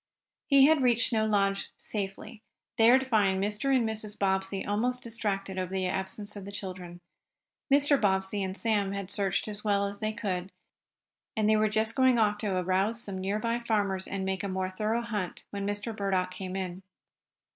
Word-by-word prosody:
He 275 -1 +7
had 310 -1 +5
reached 245 -1 +3
Snow 220 -1 +2
Lodge 195 -2 +1
safely, 210 +2 -5 0.4
there 235 +3 +7
to 265 - -2
find 205 -6 +2
Mr. 210 +5 -2
and 240 -3 +2
Mrs. 215 -1 -5
Bobbsey 190 0 0
almost 245 +5 0
distracted 195 -4 -3
over 185 0 -3
the 190 -1 -1
absence 190 +3 -3
of 200 - -7
the 200 - -8
children. 180 -3 -7 0.7
Mr. 285 0 +5
Bobbsey 190 0 +1
and 190 0 -3
Sam 205 -4 0
had 200 -1 -5
searched 195 -1 0
as 210 -1 -6
well 200 -2 +2
as 200 0 -5
they 215 0 -1
could, 195 -4 -3 0.9
and 215 -1 +2
they 215 - +5
were 215 0 +3
just 220 +1 +1
going 260 -2 +4
off 210 -2 +2
to 200 -4 -1
arouse 190 +5 +1
some 195 -4 -5
nearby 215 +5 -1
farmers 205 -5 0
and 195 -1 -3
make 190 0 -2
a - - -1
more 185 0 -2
thorough 215 +5 -1
hunt 210 -6 -4
when 200 -1 -3
Mr. 205 +2 -3
Burdock 190 -3 0
came 185 0 -6
in. 185 -1 -4
205 Hz, 185 wpm, -29 LUFS, 190-220 Hz, 0.9 s, He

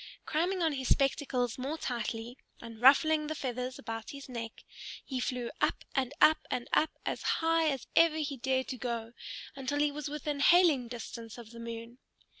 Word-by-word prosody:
Cramming 350 +4 0
on 320 - +3
his 265 -2 -3
spectacles 265 -3 +1
more 280 +5 -2
tightly 235 -3 -3 0.2
and 230 -1 -10
ruffling 305 +4 +6
the 310 - -3
feathers 255 -2 -3
about 225 -1 -6
his 280 -1 -8
neck, 230 -3 -6 0.4
he 260 -2 -3
flew 250 -2 -2
up - - +1
and 260 -2 0
up 315 - +7
and 240 - -2
up, 315 - +2
as - - -2
high 325 0 +2
as 270 -3 -3
ever 330 -1 +6
he 295 -2 -2
dared 260 +1 0
to 255 - -4
go, 235 -1 -4 0.4
until 275 +1 -2
he 295 0 +3
was 295 0 -5
within 295 -1 -3
hailing 310 -5 +5
distance 230 -1 -7
of 230 -2 -10
the 235 - -10
moon. 230 +1 -7
260 Hz, 180 wpm, -31 LUFS, 235-300 Hz, 0.4 s, up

